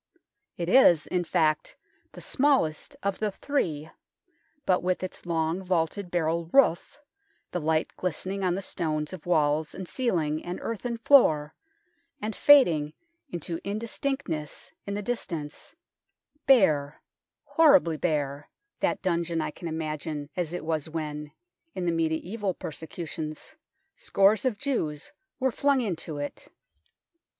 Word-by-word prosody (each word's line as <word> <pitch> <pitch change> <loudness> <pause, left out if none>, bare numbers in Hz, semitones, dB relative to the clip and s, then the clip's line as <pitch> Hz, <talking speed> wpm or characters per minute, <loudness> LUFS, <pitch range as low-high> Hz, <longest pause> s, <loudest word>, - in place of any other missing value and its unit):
It 170 - -3
is, 180 - +6
in 180 -1 -1
fact, 155 -2 0 0.4
the - - -10
smallest 270 - +1
of 200 -1 -1
the 215 - 0
three, 165 - -2 0.7
but 185 -1 +3
with 180 +1 -1
its 185 -1 -6
long 165 +1 0
vaulted 180 +1 -1
barrel 170 -1 0
roof, 275 - +3 0.5
the 175 - -2
light 160 +1 0
glistening 185 +2 -3
on 180 -1 +2
the 195 - -4
stones 155 -2 -2
of 175 -2 -9
walls 155 -2 +2
and 185 -1 -6
ceiling 165 - -1
and 175 +1 -4
earthen 230 +1 -3
floor, 160 - +5 0.7
and 215 +1 -4
fading 165 - +5 0.4
into 170 - -4
indistinctness 210 - -3 0.2
in 200 - -2
the 205 - -3
distance, 170 -10 -5 0.7
bare 155 - +4 0.4
horribly 285 - +5
bare 145 -3 -1 0.3
that - - 0
dungeon 170 -2 0
I - - -2
can 170 - -8
imagine 155 -2 -4
as 175 -3 -2
it 175 -2 -5
was 160 -1 -1
when, 150 -2 -5 0.4
in 185 - -2
the 170 - +2
mediaeval 170 +5 -1
persecutions, 160 -1 -6 0.4
scores 200 +5 +3
of 245 -5 +1
Jews 165 - -2 0.3
were 265 -1 +2
flung 280 +3 +2
into 170 -9 -3
it. 145 0 -6
170 Hz, 130 wpm, -27 LUFS, 155-200 Hz, 0.7 s, is